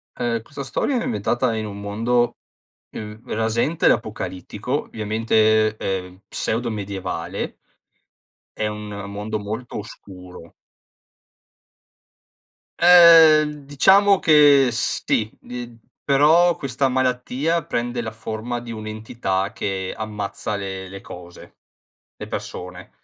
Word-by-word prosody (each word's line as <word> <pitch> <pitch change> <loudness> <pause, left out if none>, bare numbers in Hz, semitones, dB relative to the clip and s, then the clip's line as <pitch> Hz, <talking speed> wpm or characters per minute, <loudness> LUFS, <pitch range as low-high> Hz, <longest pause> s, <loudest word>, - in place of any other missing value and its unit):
Ehm, 115 -2 -2
questa 140 +3 -8
storia 245 - -1
è - - -3
ambientata 125 - 0
in 110 -1 -3
un 100 -1 -7
mondo, 115 +4 0 0.5
uhm, 105 0 -8
rasente 115 +8 +1
l'apocalittico, 110 - -2
ovviamente, 110 0 +1
ehm, 95 -2 -4
pseudo 120 +2 -2
medievale, 95 -4 -5 1.0
è 110 - -2
un 105 0 -5 0.2
mondo 105 +2 -4
molto 110 +4 -6
oscuro. 90 -5 -11 2.3
Uhm, 160 -4 +7
diciamo 195 +8 +5
che 145 -4 +6
sì, 110 -1 -1
d 120 -1 -8 0.3
però 160 +5 +4
questa 135 -1 -1
malattia 130 +5 0
prende 120 0 -2
la 110 - -4
forma 110 +2 -5
di 120 -1 -9
un'entità 110 -3 -3
che 95 -1 -3
ammazza 105 -1 -4
le 95 -1 -5
le 100 +1 -8
cose, 90 -2 -12 0.6
le - - -8
persone. 90 0 -7
110 Hz, 105 wpm, -22 LUFS, 105-135 Hz, 2.3 s, Uhm